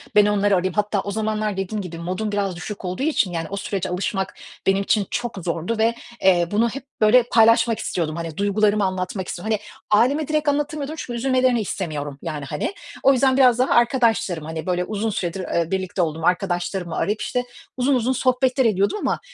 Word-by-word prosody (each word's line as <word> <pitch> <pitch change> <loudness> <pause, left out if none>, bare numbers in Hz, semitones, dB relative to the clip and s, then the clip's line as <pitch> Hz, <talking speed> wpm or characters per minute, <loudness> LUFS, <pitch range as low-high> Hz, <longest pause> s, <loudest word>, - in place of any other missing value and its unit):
ben 210 - +7
onları 205 -1 +2
arayayım. 185 0 0
Hatta, 210 -1 0
o 200 - -5
zamanlar, 215 -1 -1
dediğim 200 +2 -2
gibi 170 -3 -7
modun 185 +5 -3
biraz 200 -3 -1
düşük 200 +3 -7
olduğu 185 +8 -3
için, 285 - +1
yani, 165 -1 -3
o 200 - -4
sürece 195 -2 -3
alışmak, 190 +1 -2 0.3
benim 195 +1 +3
için 200 -1 +1
çok 240 -3 -3
zordu 170 +6 -2
ve, 225 +1 +2 0.3
eee, 175 -3 +4
bunu 225 +3 +2
hep 270 +4 -7 0.2
böyle 225 +4 +6
paylaşmak 230 -1 +4
istiyordum, 160 -7 -2
hani, 165 -2 -5
duygularımı 205 0 +2
anlatmak 185 0 -3
istiyordum. 215 +5 -2
Hani, 210 - -19 0.4
aileme 285 +4 0
direkt 305 -1 +1
anlatamıyordum 295 +1 -2
çünkü 240 -5 -5
üzülmelerini 255 -1 +2
istemiyorum 150 -8 -4
yani, 150 -4 -5
hani. 150 - -3 0.3
O 275 - +6
yüzden 260 0 +3
biraz 250 -3 +5
daha 255 - +2
arkadaşlarım, 230 - +2
hani 160 0 -5
böyle 180 -1 0
uzun 215 +2 -2
süredir, 190 -3 -3
ııı, 170 -1 0
birlikte 185 -1 -1
olduğum 160 -1 -2
arkadaşlarımı 180 -1 -1
arayıp, 210 +1 -1
işte, 250 -1 -1 0.3
uzun, 260 +2 +2
uzun 250 +1 +1
sohbetler 255 +1 +2
ediyordum 200 - +2
ama, - - 0
205 Hz, 190 wpm, -22 LUFS, 180-240 Hz, 0.4 s, ben